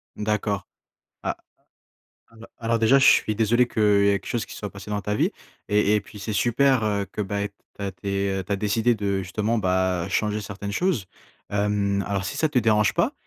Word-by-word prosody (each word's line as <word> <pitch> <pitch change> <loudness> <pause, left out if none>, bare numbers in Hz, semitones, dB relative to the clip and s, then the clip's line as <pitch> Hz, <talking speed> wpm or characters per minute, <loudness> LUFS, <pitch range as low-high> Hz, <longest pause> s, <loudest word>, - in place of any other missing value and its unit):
D'accord. 105 -2 -1 0.6
Ah. - - -2 0.9
Alors 115 0 -14
alors 115 0 0
déjà, 115 +5 +5
je 135 - +4
suis 110 - +5
désolé 115 +3 +3
qu'il 110 - -1
y 100 -1 +4
ait - - +4
quelque 95 - -18
chose 115 -2 -2
qui - - -10
soit 105 - -6
passé 100 +1 -10
dans 105 0 -1
ta 105 - -1
vie. - - +2 0.4
Et 105 0 +3
et - - +1
puis, 105 +1 -13
c'est 110 +2 -4
super, 120 +4 +3
heu, 100 -2 0
que, - - -5
ben, 100 0 -2 0.3
tu - - -8
as 100 - -2
dé 100 -1 -1
tu 100 - -2
as - - +1
décidé 110 +4 +1
de, 100 -2 -1
justement, 105 +5 -1
bah, 95 -3 +1
changer 105 +2 0
certaines 100 0 -6
choses. 155 - 0 0.4
Hem, 100 -1 0
alors, 100 -1 -1
si - - -4
ça 155 - +2
te 145 -4 +1
dérange 105 -3 +3
pas, - - +2
105 Hz, 210 wpm, -24 LUFS, 100-110 Hz, 0.9 s, déjà